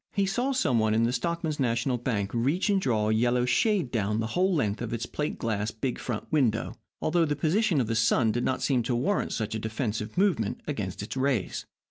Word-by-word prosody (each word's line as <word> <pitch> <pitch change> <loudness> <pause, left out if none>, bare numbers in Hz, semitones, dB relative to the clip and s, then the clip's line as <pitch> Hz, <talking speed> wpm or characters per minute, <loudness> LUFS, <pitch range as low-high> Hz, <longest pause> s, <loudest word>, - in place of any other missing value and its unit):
He 200 -2 +2
saw 245 +8 0
some 150 - +2
one 110 0 +2
in 115 - +3
the 120 +1 +1
Stockmen's 160 +3 -2
National 120 0 0
Bank 105 -5 -1
reach 140 - +1
and 195 -1 +2
draw 110 - +1
a - - +3
yellow 120 +2 +2
shade 175 - +2
down 105 -2 0
the 115 - 0
whole 185 +2 +2
length 110 - 0
of 115 -1 -3
its 115 0 -2
plate 150 0 -3
glass, 105 -2 -1
big 120 +3 -3
front 115 -4 -4
window, 125 -8 +1 0.3
although 170 +1 +2
the 150 -2 0
position 170 +3 +2
of 125 - +2
the 115 - -2
sun 110 +1 +3
did 120 +3 -1
not 130 - -1
seem 130 -4 +2
to 120 +1 -1
warrant 140 +12 0
such 110 -1 -2
a 110 - -2
defensive 110 0 -3
movement 180 - +1
against 105 -10 -4
its 105 - -6
rays. 130 -7 -1
120 Hz, 220 wpm, -27 LUFS, 110-155 Hz, 0.3 s, in